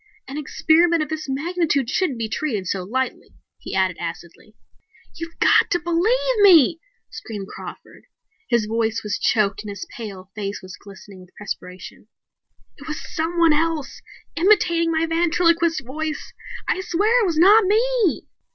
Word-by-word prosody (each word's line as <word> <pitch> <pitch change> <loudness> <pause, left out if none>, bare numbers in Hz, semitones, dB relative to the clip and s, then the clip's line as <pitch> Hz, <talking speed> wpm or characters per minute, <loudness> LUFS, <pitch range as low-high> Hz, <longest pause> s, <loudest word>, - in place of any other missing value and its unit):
"An 270 - -7
experiment 320 +3 +2
of - - -8
this 310 -2 -5
magnitude 300 -1 0
shouldn't 305 - -1
be 225 -1 -2
treated 220 -3 -3
so 185 +1 -2
lightly," 255 +8 -4 0.2
he - - -7
added 190 -2 +1
acidly. 170 +5 -8 0.6
"You've 330 0 -8
got - - +4
to 350 - +1
believe 440 +9 +1
me!" 335 -6 +6 0.3
screamed 205 -3 -7
Crawford. - - -11 0.4
His 235 -3 +2
voice 225 0 -1
was 210 -1 -3
choked 210 -2 +1
and 210 - -8
his 200 -1 -6
pale 195 -5 -9
face 205 -1 -4
was 185 0 -9
glistening 195 -1 -14
with 180 - -19
perspiration. 185 -1 -8 0.7
"It 285 - -12
was 305 -1 -7
someone 330 -1 +2
else, 320 -1 -1 0.3
imitating 340 -2 +3
my 320 0 +1
ventriloquist 335 -2 +1
voice! 310 +4 -5 0.3
I 375 - 0
swear 420 +7 +2
it 420 - +2
was 330 -3 -1
not 400 +6 +6
me!" 450 -1 +1
310 Hz, 150 wpm, -22 LUFS, 210-340 Hz, 0.7 s, me